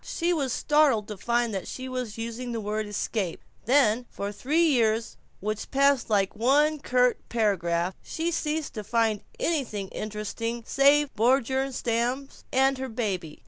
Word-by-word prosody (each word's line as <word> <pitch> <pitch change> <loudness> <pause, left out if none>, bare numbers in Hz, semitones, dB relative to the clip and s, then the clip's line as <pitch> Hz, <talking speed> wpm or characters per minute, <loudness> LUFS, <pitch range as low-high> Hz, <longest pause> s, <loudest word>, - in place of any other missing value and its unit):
She 345 +1 -1
was 280 -6 -1
startled 285 -7 +3
to 210 - -4
find 235 +2 0
that 190 - -4
she 260 0 -6
was 250 -4 -4
using 235 +2 -4
the 230 - -2
word 215 0 -2
"escape." 205 -3 -2 0.3
Then, 245 -2 +3
for 200 0 -4
three 295 +10 +1
years 230 -7 +2 0.3
which 215 +2 -3
passed 275 -2 +3
like 200 -2 +1
one 290 +7 +3
curt 250 -2 +2
paragraph, 180 -6 0
she 330 +1 -3
ceased 310 -2 -2
to 215 - -5
find 225 -1 +1 0.2
anything 235 - -1
interesting 215 +2 -4
save 280 +1 +4
the 220 - -7
Bjornstams 260 0 0
and 270 0 +3
her 265 0 -4
baby. 190 -9 -3
235 Hz, 150 wpm, -27 LUFS, 215-270 Hz, 0.3 s, save